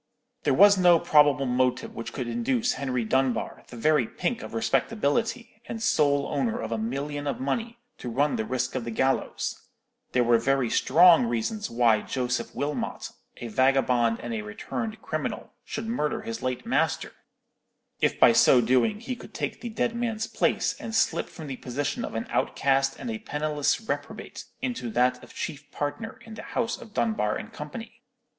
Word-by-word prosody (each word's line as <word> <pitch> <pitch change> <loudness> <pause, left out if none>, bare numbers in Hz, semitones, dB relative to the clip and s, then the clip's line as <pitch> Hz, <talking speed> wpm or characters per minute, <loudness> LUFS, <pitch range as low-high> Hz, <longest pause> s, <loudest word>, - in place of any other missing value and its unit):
There 145 - +3
was 200 +2 +7
no 175 -2 +7
probable 145 -3 +4
motive 125 0 0
which 115 - -6
could 125 - -4
induce 240 - 0
Henry 125 -4 -2
Dunbar, 130 +2 0
the 120 - -10
very 150 -1 +3
pink 225 - -2
of - - -8
respectability, 225 - 0
and 225 - -5
sole 145 -9 +2
owner 135 -6 -1
of 110 0 -4
a 115 - 0
million 145 +5 -3
of 140 - -2
money, 230 - -2 0.2
to 125 - -5
run 140 +5 +1
the - - -1
risk 125 +2 -2
of 130 - -2
the 120 - -5
gallows; 130 +4 -1 0.5
there 125 - +4
were 120 -1 +4
very 135 0 +1
strong 165 -2 +6
reasons 120 - -2
why 115 -2 +3
Joseph 125 -2 -2
Wilmot, 145 +1 -3 0.3
a 120 - -6
vagabond 125 -1 +2
and 120 - -4
a 110 - -2
returned 215 - -5
criminal, - - -4
should 225 - -5
murder 215 -5 -1
his 225 0 -5
late 125 -1 -3
master, - - 0 0.9
if - - +1
by - - +8
so 125 - +6
doing 130 - +2
he 255 +1 -4
could - - -13
take - - -3
the 240 - -4
dead 230 +1 -1
man's 225 -2 -1
place, - - +1
and 225 - -5
slip - - +1
from 160 - -9
the 135 -3 -5
position 135 +3 -3
of - - -5
an - - -2
outcast 135 0 +1
and 240 - -4
a 220 - -4
penniless 150 -7 0
reprobate 220 - -5 0.2
into 240 - -2
that 125 +2 +1
of - - -14
chief 150 -3 -6
partner 150 +10 -4
in 225 - -10
the 220 - -7
house 235 -1 -2
of 225 - -12
Dunbar 215 - +1
and 105 - -7
Company. 225 +10 -8
140 Hz, 180 wpm, -26 LUFS, -, 0.9 s, by